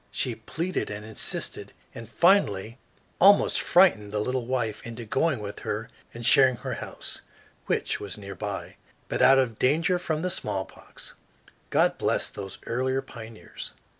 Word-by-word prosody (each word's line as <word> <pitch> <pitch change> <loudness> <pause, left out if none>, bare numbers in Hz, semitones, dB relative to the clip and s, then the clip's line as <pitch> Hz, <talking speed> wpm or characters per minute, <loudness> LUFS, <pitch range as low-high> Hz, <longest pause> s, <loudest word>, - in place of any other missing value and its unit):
She 125 - -1
pleaded 165 +11 -3
and 105 0 -6
insisted, 110 0 -2 0.2
and 115 -2 -9
finally 115 - +2 0.4
almost 200 +2 +6
frightened 115 - +4
the 105 - -2
little 125 +2 -2
wife 120 -5 -1
into 115 0 -7
going 150 +6 +1
with 105 -1 -7
her 110 +2 -4 0.2
and 120 0 -7
sharing 130 +1 +6
her - - -5
house, - - -5 0.5
which - - 0
was 100 -1 -6
near 100 -1 -8
by, 90 - -6 0.3
but - - -1
out 135 - +7
of 120 -5 +1
danger 165 +7 +2
from 160 -2 -2
the 180 - 0
smallpox. 95 - -5 0.6
God - - +2
bless - - 0
those 95 -1 -7
earlier 130 +3 -1
pioneers! 115 -3 -9
120 Hz, 150 wpm, -26 LUFS, 105-140 Hz, 0.6 s, out